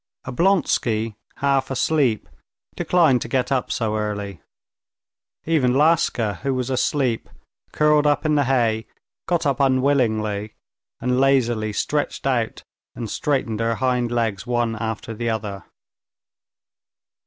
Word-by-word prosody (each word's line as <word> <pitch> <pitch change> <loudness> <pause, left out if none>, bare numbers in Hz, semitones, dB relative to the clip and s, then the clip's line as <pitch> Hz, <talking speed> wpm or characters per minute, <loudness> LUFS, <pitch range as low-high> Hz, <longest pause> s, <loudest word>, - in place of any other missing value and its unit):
Oblonsky, 125 - +1 0.2
half 140 -1 +1
asleep, 135 -3 +1 0.5
declined 160 -9 +3
to - - -4
get 125 +1 -1
up 130 -2 0
so 110 -2 -1
early. 105 -3 -4 1.0
Even 135 -6 +2
Laska, 135 - +2
who 135 -1 -1
was 130 0 -2
asleep, 130 -2 0 0.4
curled 150 -1 +3
up 145 +1 +1
in 155 - +2
the 145 -2 +3
hay, 115 -4 +1 0.4
got 170 -1 0
up 140 -3 +1
unwillingly, 120 -6 +1 0.4
and 125 +1 0
lazily 120 -5 +2
stretched 145 +8 -2
out 120 -5 -1 0.3
and 115 -3 -5
straightened 130 -7 -1
her 115 0 0
hind 125 +1 0
legs 115 -3 -1
one 120 -2 0
after 110 0 -4
the 115 +1 -2
other. 105 -3 -4
125 Hz, 120 wpm, -22 LUFS, 110-140 Hz, 1.0 s, declined